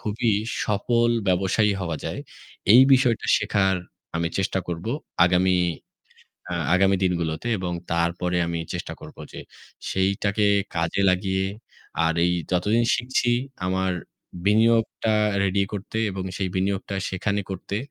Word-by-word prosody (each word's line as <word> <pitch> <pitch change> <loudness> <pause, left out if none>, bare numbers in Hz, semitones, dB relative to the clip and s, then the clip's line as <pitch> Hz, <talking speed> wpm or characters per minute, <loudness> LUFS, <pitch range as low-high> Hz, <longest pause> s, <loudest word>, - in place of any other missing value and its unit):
খুবই 110 +2 -1 0.3
সফল 115 +3 +1 0.2
ব্যবসায়ী 95 +3 +2
হওয়া 85 -4 -2
যায়। - - -4 0.5
এই 120 - +9
বিষয়টা 125 -3 +3
শেখার 95 -1 +1 0.4
আমি 85 0 0
চেষ্টা 95 0 0
করবো 85 +5 -3 0.3
আগামী 90 +1 +3 0.9
অ্যা - - -3 0.2
আগামী 95 +1 +4
দিনগুলোতে 85 +1 -1
এবং 90 -2 -3 0.2
তারপরে 85 +1 0
আমি 85 0 -2
চেষ্টা - - -5
করবো - - -11
যে - - -8 0.5
সেইটাকে 100 +2 +1 0.3
কাজে 85 +3 0
লাগিয়ে 95 +1 0 0.6
আর 80 - +2
এই 90 - +2 0.2
যতদিন 105 +6 +2
শিখছি 120 0 0 0.4
আমার 95 0 0 0.5
বিনিয়োগটা 110 +1 +3 0.3
ready 100 0 +2
করতে। 105 +2 -5
এবং 95 -1 -4
সেই 95 -2 -1
বিনিয়োগটা 95 +1 -1
সেখানে 100 +2 -1
করতে 95 +1 -5
95 Hz, 125 wpm, -24 LUFS, 90-105 Hz, 0.9 s, এই